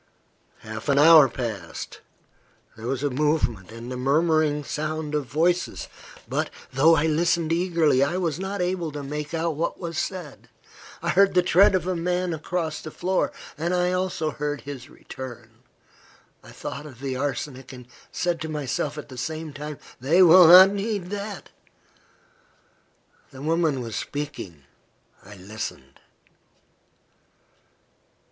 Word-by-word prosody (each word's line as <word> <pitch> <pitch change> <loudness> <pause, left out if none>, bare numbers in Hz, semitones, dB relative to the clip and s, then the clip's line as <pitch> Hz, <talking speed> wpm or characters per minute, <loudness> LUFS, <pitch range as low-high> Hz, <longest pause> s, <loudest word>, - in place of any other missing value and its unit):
Half 110 +4 -7
an 140 - +3
hour 155 -2 +8
passed. 110 -9 -6 0.8
There 115 +1 -7
was 135 +1 -2
a 145 - 0
movement, 125 - 0
and 115 +2 -8
the 125 - -4
murmuring 150 +2 +2
sound 155 +1 -4
of 150 -3 -1
voices, 170 +5 0 0.4
but, - - -1 0.2
though 155 +5 +5
I 155 - +1
listened 165 +1 +1
eagerly, 165 -6 +2
I 145 +6 0
was 170 -4 -1
not 190 0 -3
able 180 -3 -2
to 145 -1 -5
make 150 +3 -5
out 165 0 0
what 165 +3 -2
was 170 -3 -4
said. 180 -7 -6 0.5
I - - -1
heard 195 0 +4
the 180 - +5
tread 190 +2 +5
of 180 -3 0
a 185 0 -1
man 180 +1 -1
across 160 0 -3
the 155 - -7
floor, 185 +4 -1 0.3
and 170 +3 0
I 180 0 +1
also 180 -4 -1
heard 145 -2 -3
his 140 0 -8
return. 120 -3 -10 0.9
I - - -14
thought 145 +2 -7
of 130 -5 -13
the 135 -1 -3
arsenic, 135 -1 -4
and 125 -2 -11 0.2
said 175 -2 -1
to 160 - -4
myself, 145 0 -3
at 150 - -7
the 130 -3 -9
same 155 +3 -4
time, 150 0 -7 0.2
"They 160 +9 +4
will 180 0 +8
not 185 +3 +10
need 200 -2 -3
that." 205 -1 -6 1.8
The 135 +1 -11
woman 160 -4 +1
was 115 -3 -6
speaking. 100 - -6 0.6
I 105 +2 -12
listened. 100 +4 -8
155 Hz, 145 wpm, -24 LUFS, 135-175 Hz, 1.8 s, not